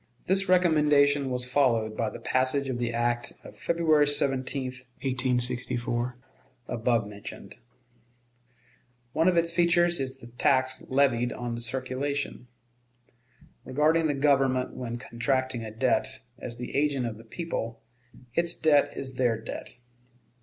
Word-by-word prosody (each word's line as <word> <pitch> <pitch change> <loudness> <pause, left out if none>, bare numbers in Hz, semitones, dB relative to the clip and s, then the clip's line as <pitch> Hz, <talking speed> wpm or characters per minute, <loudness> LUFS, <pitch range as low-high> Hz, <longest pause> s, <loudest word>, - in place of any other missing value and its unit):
This 190 0 +2
recommendation 150 -6 +4
was 125 -1 0
followed 120 -5 +1
by 115 -1 -1
the - - -8
passage 130 +2 0
of 125 -2 -2
the 120 -1 -1
act 120 +1 0
of - - -12
February 160 -3 +2
17, 135 -1 0
1864, 125 -1 0 0.5
above 115 -2 0
mentioned. 105 0 -10 1.5
One 160 +2 +2
of 180 -2 +3
its 170 0 +2
features 175 0 +3
is 130 -1 -3
the 130 - -13
tax 130 +2 +1
levied 130 -3 +2
on 120 0 -4
the 120 - -4
circulation. 130 +2 -3 1.2
Regarding 155 +4 +2
the 145 - 0
Government 135 -2 +2
when 120 -1 -5
contracting 125 0 -2
a 110 - -5
debt 110 +1 0 0.2
as 120 -1 -7
the 125 +1 -6
agent 140 -3 +1
of 110 -2 -4
the - - -12
people, 115 -4 -5 0.5
its 170 +2 +2
debt 145 -2 +3
is 130 -2 -6
their 120 -3 +1
debt. 115 - -7
130 Hz, 130 wpm, -27 LUFS, 120-145 Hz, 1.5 s, recommendation